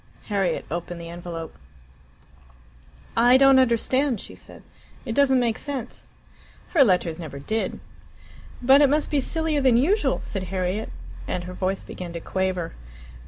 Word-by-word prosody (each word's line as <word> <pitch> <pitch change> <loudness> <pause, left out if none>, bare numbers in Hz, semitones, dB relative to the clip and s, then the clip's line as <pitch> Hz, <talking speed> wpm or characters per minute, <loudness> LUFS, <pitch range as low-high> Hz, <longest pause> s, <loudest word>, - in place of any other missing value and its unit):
Harriet 195 -3 0
opened 175 +1 -4
the 170 0 -8
envelope. 170 -2 -7 1.6
"I 245 +2 +6
don't 270 0 +6
understand," 255 +1 +2
she - - -10
said; - - -13 0.4
"it 230 - -3
doesn't 265 0 +4
make 235 -3 0
sense." 270 -5 -6 0.6
"Her 305 -6 +5
letters 180 -6 +1
never 155 -5 -7
did." 220 +11 -3 0.8
"But 270 +3 +7
it 285 - +6
must 300 +2 0
be 290 -2 +2
sillier 320 +1 -1
than 255 -3 +4
usual," 385 - +2
said 195 -3 -4
Harriet, 185 +3 -2 0.4
and 180 - -2
her 180 +1 -7
voice 190 +1 -2
began 175 -2 -8
to 170 - -4
quaver. 185 -1 -2
220 Hz, 145 wpm, -24 LUFS, 180-265 Hz, 1.6 s, But